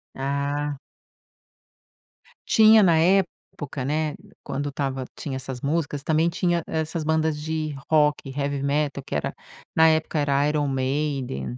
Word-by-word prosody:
Ah. 140 Hz, +1 st, -2 dB, 1.7 s
Tinha 220 Hz, -1 st, +7 dB
na 170 Hz, -3 st, +5 dB
época, 165 Hz, -6 st, 0 dB
né, 150 Hz, +2 st, -1 dB, 0.3 s
quando 145 Hz, +1 st, -3 dB
estava 135 Hz, -2 st, -3 dB
tinha 135 Hz, -3 st, -5 dB
essas 130 Hz, -1 st, -6 dB
músicas, 145 Hz, -1 st, -1 dB
também 160 Hz, +2 st, +2 dB
tinha 175 Hz, 0 st, 0 dB
essas 160 Hz, 0 st, -2 dB
bandas 160 Hz, -1 st, 0 dB
de 155 Hz, -1 st, -3 dB
rock, 150 Hz, -3 st, +2 dB
heavy 140 Hz, 0 st, -2 dB
metal 140 Hz, -1 st, -1 dB
que 140 Hz, -, -5 dB
era 75 Hz, -, -2 dB, 0.4 s
na 160 Hz, 0 st, +6 dB
época 160 Hz, 0 st, 0 dB
era 140 Hz, 0 st, +2 dB
Iron 150 Hz, -1 st, 0 dB
Maiden, 130 Hz, -, -2 dB
145 Hz, 130 wpm, -24 LUFS, 140-160 Hz, 1.7 s, Tinha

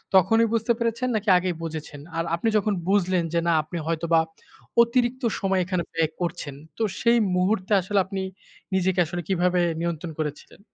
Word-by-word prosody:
তখনই 225 Hz, +5 st, +5 dB
বুঝতে 230 Hz, +1 st, +1 dB
পেরেছেন, 235 Hz, +2 st, 0 dB
নাকি 210 Hz, -1 st, -1 dB
আগেই 180 Hz, -1 st, -1 dB
বুঝেছেন? 155 Hz, -3 st, -6 dB, 0.2 s
আর 165 Hz, -, +1 dB
আপনি 225 Hz, -, -2 dB
যখন 210 Hz, 0 st, +1 dB, 0.2 s
বুঝলেন 185 Hz, -3 st, +2 dB
যে, 170 Hz, -, +3 dB
না, -, -, +4 dB
আপনি 170 Hz, +3 st, -6 dB
হয়তোবা 165 Hz, 0 st, +2 dB, 0.6 s
অতিরিক্ত 240 Hz, +2 st, +1 dB, 0.2 s
সময় 195 Hz, -2 st, +1 dB
এখানে 180 Hz, -2 st, -1 dB
ব্যয় 160 Hz, -1 st, +1 dB
করছেন। 165 Hz, -5 st, -3 dB, 0.2 s
তো 225 Hz, -, 0 dB, 0.2 s
সেই 235 Hz, +1 st, +4 dB, 0.2 s
মুহূর্তে 185 Hz, +2 st, 0 dB
আসলে 200 Hz, +2 st, +1 dB
আপনি 190 Hz, 0 st, -4 dB, 0.5 s
নিজেকে 185 Hz, 0 st, +1 dB
আসলে 175 Hz, +2 st, -4 dB
কীভাবে 180 Hz, -1 st, +2 dB, 0.2 s
নিয়ন্ত্রণ 170 Hz, 0 st, -3 dB
করেছিলেন? 150 Hz, -1 st, -5 dB
185 Hz, 160 wpm, -25 LUFS, 170-215 Hz, 0.6 s, তখনই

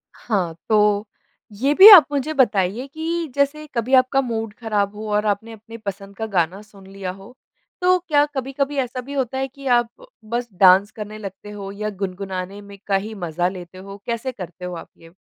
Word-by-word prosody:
हाँ, 185 Hz, -8 st, -2 dB
तो। 210 Hz, -1 st, +3 dB, 0.5 s
ये 260 Hz, +8 st, 0 dB
भी 385 Hz, +7 st, +10 dB
आप 360 Hz, -9 st, +11 dB
मुझे 290 Hz, +2 st, -1 dB
बताइए 215 Hz, -4 st, +1 dB
कि 325 Hz, +3 st, -3 dB
जैसे 285 Hz, +2 st, 0 dB
कभी 235 Hz, +3 st, -1 dB
आपका 260 Hz, +1 st, +4 dB
मूड 225 Hz, -4 st, -4 dB
ख़राब 210 Hz, -3 st, -1 dB
हो 215 Hz, +1 st, -6 dB
और 210 Hz, +1 st, +1 dB
आपने 210 Hz, +2 st, -1 dB
अपने 225 Hz, +1 st, -11 dB
पसंद 200 Hz, -2 st, -7 dB
का 220 Hz, -, -3 dB
गाना 175 Hz, +3 st, +1 dB
सुन 200 Hz, -2 st, -17 dB
लिया 195 Hz, -1 st, -6 dB
हो, 195 Hz, +6 st, -14 dB, 0.5 s
तो 365 Hz, 0 st, +4 dB
क्या 290 Hz, -2 st, +4 dB
कभी-कभी 275 Hz, +2 st, -2 dB
ऐसा 255 Hz, -1 st, -2 dB
भी 275 Hz, +3 st, -9 dB
होता 265 Hz, -2 st, -2 dB
है 270 Hz, -, -1 dB
कि 275 Hz, +1 st, -10 dB
आप 240 Hz, -1 st, -4 dB, 0.4 s
बस 240 Hz, +2 st, -3 dB
डांस 190 Hz, +2 st, +6 dB
करने 215 Hz, 0 st, -8 dB
लगते 205 Hz, 0 st, -9 dB
हो 200 Hz, -1 st, -7 dB
या 210 Hz, +1 st, -4 dB
गुनगुनाने 190 Hz, +1 st, -5 dB
में 200 Hz, 0 st, -13 dB
का 195 Hz, -, +2 dB
ही 210 Hz, +3 st, -2 dB
मज़ा 175 Hz, -2 st, -1 dB
लेते 180 Hz, -1 st, -10 dB
हो? 195 Hz, +1 st, -10 dB
कैसे 235 Hz, +2 st, -3 dB
करते 180 Hz, -5 st, -9 dB
हो 180 Hz, -1 st, -5 dB
आप 165 Hz, -, -9 dB
ये? 165 Hz, -, -16 dB
215 Hz, 195 wpm, -21 LUFS, 195-260 Hz, 0.5 s, आप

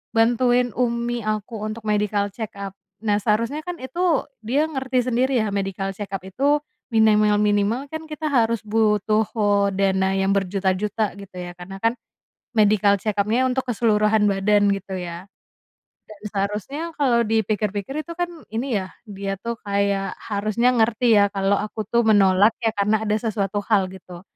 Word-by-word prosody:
bantuin 245 Hz, +1 st, +3 dB
umi 235 Hz, -1 st, 0 dB
aku 215 Hz, +1 st, -3 dB
untuk 215 Hz, +1 st, -5 dB
medical 205 Hz, -1 st, +1 dB
check-up. 200 Hz, -3 st, -6 dB, 0.3 s
Nah, 205 Hz, -1 st, +3 dB
seharusnya 230 Hz, +8 st, 0 dB
kan 355 Hz, -1 st, -5 dB
itu 330 Hz, +4 st, 0 dB, 0.2 s
dia 280 Hz, +7 st, +2 dB
ngerti 260 Hz, -4 st, -1 dB
sendiri, 255 Hz, +2 st, +2 dB
ya, -, -, -1 dB
medical 195 Hz, -1 st, -2 dB
check-up 195 Hz, -2 st, -5 dB
itu 275 Hz, +10 st, +1 dB, 0.4 s
minimal-minimal 210 Hz, +2 st, +3 dB
kan 315 Hz, 0 st, -5 dB
kita 305 Hz, 0 st, -4 dB
harus 230 Hz, -3 st, +2 dB
butuh 215 Hz, 0 st, +2 dB, 0.5 s
dana 190 Hz, 0 st, +1 dB
yang 195 Hz, 0 st, +1 dB
berjuta-juta, 195 Hz, +2 st, 0 dB
gitu 200 Hz, -1 st, -12 dB
ya, 175 Hz, 0 st, -6 dB
karena 190 Hz, +2 st, -9 dB
kan 230 Hz, +1 st, +3 dB, 0.6 s
medical 205 Hz, -1 st, +4 dB
check-up-nya 215 Hz, +4 st, +1 dB
untuk 260 Hz, +1 st, -1 dB
keseluruhan 215 Hz, -2 st, +2 dB
badan, 205 Hz, +1 st, +3 dB
gitu 195 Hz, -1 st, -5 dB
ya. 175 Hz, +1 st, -7 dB, 0.8 s
Dan 215 Hz, -1 st, -12 dB
seharusnya 210 Hz, -, -3 dB, 0.2 s
kalau 245 Hz, -5 st, +3 dB
dipikir-pikir 215 Hz, +4 st, -1 dB
itu 340 Hz, -, -6 dB
kan 350 Hz, 0 st, -1 dB, 0.2 s
ini, 235 Hz, 0 st, -1 dB
ya, 185 Hz, -, -10 dB, 0.2 s
dia 195 Hz, -1 st, -4 dB
tuh 235 Hz, 0 st, -4 dB
kayak 200 Hz, -1 st, 0 dB
harusnya 215 Hz, +4 st, +1 dB
ngerti, 230 Hz, 0 st, +3 dB
ya, 200 Hz, -, +4 dB
kalau 195 Hz, 0 st, +1 dB
aku 215 Hz, +1 st, -4 dB
tuh 235 Hz, +1 st, +3 dB
menolak, 200 Hz, -1 st, +5 dB
ya, 225 Hz, -, +2 dB
karena 210 Hz, +2 st, +1 dB
ada 210 Hz, -, +1 dB
sesuatu 205 Hz, -2 st, -2 dB
hal, 200 Hz, -4 st, +2 dB
gitu, 180 Hz, -2 st, -11 dB
210 Hz, 150 wpm, -22 LUFS, 200-235 Hz, 0.8 s, menolak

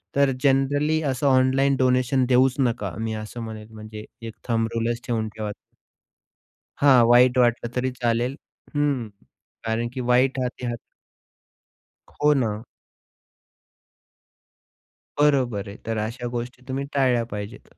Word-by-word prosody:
तर 140 Hz, -1 st, +4 dB
जनरली 145 Hz, +3 st, +2 dB
असं 130 Hz, +2 st, -1 dB
online 135 Hz, +1 st, +3 dB
donation 130 Hz, 0 st, +2 dB
देऊच 130 Hz, +1 st, +4 dB
नका, 115 Hz, -7 st, 0 dB
मी 110 Hz, 0 st, -2 dB
असं 110 Hz, +2 st, -6 dB
म्हणेल 110 Hz, -1 st, -8 dB
म्हणजे 110 Hz, 0 st, -9 dB, 0.2 s
एक 110 Hz, -, -7 dB, 0.2 s
थंब 115 Hz, -1 st, +1 dB
रूलच 115 Hz, +1 st, -1 dB
ठेवून 110 Hz, -2 st, -1 dB
ठेवा. 105 Hz, -1 st, -5 dB, 1.3 s
हां. 130 Hz, -4 st, +6 dB
वाईट 125 Hz, +1 st, +5 dB
वाटलं 120 Hz, -1 st, +2 dB
तरी 130 Hz, +1 st, 0 dB
चालेल. 120 Hz, +1 st, -1 dB, 0.4 s
हं. 140 Hz, -6 st, 0 dB, 0.6 s
कारण 115 Hz, +1 st, 0 dB
की 130 Hz, -, -4 dB
वाईट 130 Hz, +2 st, +3 dB
हाती 125 Hz, 0 st, -3 dB
हात 120 Hz, -1 st, -2 dB, 1.3 s
हो, 150 Hz, 0 st, +2 dB
ना. 110 Hz, -6 st, -1 dB, 2.6 s
बरोबर 125 Hz, -9 st, +2 dB
आहे. 100 Hz, -, -9 dB
तर 115 Hz, -1 st, -2 dB
अशा 115 Hz, +3 st, -3 dB
गोष्टी 125 Hz, +1 st, -7 dB
तुम्ही 135 Hz, +1 st, -3 dB
टाळल्या 125 Hz, -4 st, +2 dB
पाहिजेत. 105 Hz, +1 st, -9 dB
125 Hz, 125 wpm, -24 LUFS, 115-135 Hz, 2.6 s, हां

